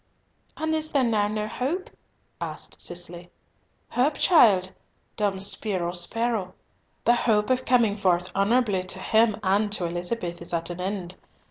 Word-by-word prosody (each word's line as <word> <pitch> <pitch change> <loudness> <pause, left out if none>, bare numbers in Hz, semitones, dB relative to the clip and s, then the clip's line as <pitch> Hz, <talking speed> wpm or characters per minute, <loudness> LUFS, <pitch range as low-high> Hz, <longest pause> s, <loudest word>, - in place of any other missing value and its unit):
"And 315 0 -1
is 315 0 -1
there 275 -2 +3
now 215 -4 +2
no 215 0 -2
hope?" 295 - -3 0.5
asked - - -4
Cicely. 175 0 -5 0.6
"Hope, 280 +4 +1
child? 200 - +5 0.4
Dum 200 -3 0
spiro, 190 -3 0
spero. 205 +1 -1 0.5
The 240 - +6
hope 220 -2 +2
of 255 0 +1
coming 235 -5 +3
forth 180 -3 +1
honourably 205 -1 +2
to 185 +1 -4
him 220 +3 +3
and 205 +2 +2
to 185 -4 -2
Elizabeth 175 +1 -3
is 170 - -2
at 165 +1 -2
an 175 +1 -6
end. 185 -1 -4
205 Hz, 145 wpm, -25 LUFS, 180-235 Hz, 0.6 s, The